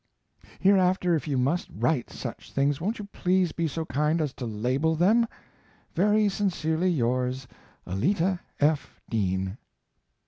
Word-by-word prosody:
Hereafter 185 -2 +3
if 160 -1 -1
you 140 -3 0
must 140 +8 0
write 150 -7 0
such - - -7
things 140 +2 +1
won't 210 +6 -1
you 210 - -6
please 180 -2 +2
be 165 -1 -1
so 160 +2 -3
kind 150 +3 +1
as 150 -4 -1
to 125 - -5
label 130 +9 0
them? 215 +8 +4 0.7
Very 210 +3 +3
sincerely 185 -4 0
yours, 130 -3 0 0.4
ALLETTA 175 - +1 0.2
F. 145 -1 +1
DEAN. 95 -1 -1
160 Hz, 135 wpm, -27 LUFS, 130-185 Hz, 0.7 s, them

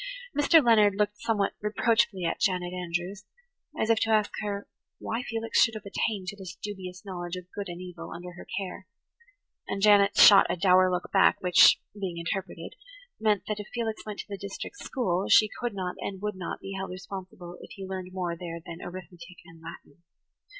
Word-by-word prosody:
Mr. 295 0 +5
Leonard 210 -4 +5
looked 210 0 -1
somewhat 205 -3 0
reproachfully 210 -3 +1
at 165 - -1
Janet 180 -2 0
Andrews, 180 +2 -4 0.6
as 220 - +2
if 225 - +3
to 225 - 0
ask 215 -2 +3
her 205 -1 -4 0.3
why 230 +2 -3
Felix 230 -2 0
should 225 - +4
have 215 -1 -8
attained 200 0 -2
to 205 - -7
this 190 -2 -9
dubious 185 -2 -8
knowledge 175 -2 -5
of 180 0 -10
good 200 -2 -4
and 175 0 -7
evil 180 -2 -8
under 180 +1 -8
her 175 - -12
care; 190 -1 -5 0.8
and 195 - -3
Janet 205 -1 +5
shot 200 -2 +9
a - - +1
dour 185 0 +5
look 180 -1 -3
back 195 - +5
which, 180 -1 +7
being 190 -4 -5
interpreted, 185 +3 -4 0.5
meant 215 -2 +2
that 215 -1 -2
if 210 - -7
Felix 225 -2 -3
went 210 -1 -7
to - - -16
the 200 -2 -6
district 200 - -7
school 195 - -1
she 215 -1 +6
could 240 -4 -3
not 185 -2 -3
and 195 -1 -5
would 210 0 -3
not 185 -2 -6
be 195 0 -7
held 190 0 -4
responsible 180 -1 -8
if - - -11
he 195 - -7
learned 185 -1 -6
more 180 -2 -3
there 170 -1 -6
than 170 0 -10
arithmetic 175 -1 -10
and 165 0 -16
Latin. 165 -1 -12
190 Hz, 190 wpm, -28 LUFS, 180-210 Hz, 0.8 s, shot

